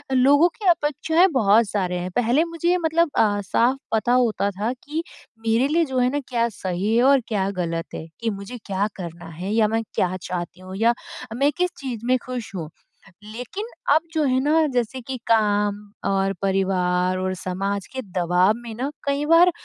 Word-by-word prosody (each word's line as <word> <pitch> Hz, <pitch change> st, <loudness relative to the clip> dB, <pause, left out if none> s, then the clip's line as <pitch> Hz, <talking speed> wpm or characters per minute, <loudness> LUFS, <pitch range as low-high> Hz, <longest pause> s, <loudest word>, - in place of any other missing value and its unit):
लोगों 285 Hz, +6 st, +6 dB
की 425 Hz, -, -7 dB
अपेक्षाएँ 320 Hz, +2 st, +3 dB
बहुत 220 Hz, -3 st, +4 dB
सारे 185 Hz, -3 st, -1 dB
हैं। 180 Hz, +1 st, -4 dB
पहले 245 Hz, +6 st, +3 dB
मुझे 335 Hz, 0 st, -2 dB
ये 360 Hz, -, +4 dB
मतलब 330 Hz, +1 st, +2 dB
अ, 205 Hz, -2 st, +3 dB
साफ़ 235 Hz, +7 st, +2 dB, 0.2 s
पता 220 Hz, +2 st, +1 dB
होता 235 Hz, -5 st, +2 dB
था 220 Hz, +3 st, 0 dB
कि 310 Hz, +3 st, -3 dB, 0.4 s
मेरे 230 Hz, +4 st, +3 dB
लिए 330 Hz, +3 st, +2 dB
जो 260 Hz, -, -2 dB
है 250 Hz, 0 st, +3 dB
ना 290 Hz, -, 0 dB
क्या 235 Hz, -2 st, +1 dB
सही 190 Hz, +1 st, -2 dB
है 240 Hz, -, +4 dB
और 275 Hz, +1 st, +6 dB
क्या 195 Hz, -3 st, 0 dB
ग़लत 165 Hz, -2 st, -3 dB
है 160 Hz, -, -6 dB
कि 230 Hz, -, -1 dB
मुझे 200 Hz, +4 st, -6 dB
क्या 200 Hz, +1 st, 0 dB
करना 170 Hz, -2 st, -8 dB, 0.2 s
है 190 Hz, +2 st, -3 dB
या 220 Hz, -1 st, +4 dB
मैं 225 Hz, +1 st, 0 dB
क्या 185 Hz, 0 st, 0 dB
चाहती 180 Hz, 0 st, -5 dB
हूँ 185 Hz, 0 st, -8 dB
या 230 Hz, +3 st, +4 dB, 0.4 s
मैं 280 Hz, +4 st, +3 dB
किस 360 Hz, 0 st, +2 dB
चीज़ 240 Hz, -5 st, -5 dB
में 255 Hz, +1 st, +3 dB
खुश 245 Hz, -4 st, -5 dB
हूँ। 160 Hz, -4 st, -5 dB, 0.5 s
लेकिन 245 Hz, -, -6 dB, 0.3 s
अब 310 Hz, -, +4 dB
जो 315 Hz, -2 st, +1 dB
है 260 Hz, -1 st, +2 dB
ना 310 Hz, +2 st, +3 dB
जैसे 245 Hz, +1 st, -1 dB
कि 260 Hz, +2 st, -5 dB
काम 210 Hz, -2 st, +3 dB, 0.3 s
और 195 Hz, 0 st, +1 dB
परिवार 185 Hz, -2 st, +1 dB
और 185 Hz, 0 st, -1 dB
समाज 195 Hz, +2 st, -3 dB
के 260 Hz, -, -3 dB, 0.2 s
दबाव 180 Hz, +3 st, +3 dB
में 235 Hz, -1 st, -8 dB
ना 260 Hz, +5 st, -2 dB, 0.2 s
कई 280 Hz, +1 st, 0 dB
बार 335 Hz, +3 st, +6 dB
225 Hz, 190 wpm, -23 LUFS, 195-270 Hz, 0.5 s, लोगों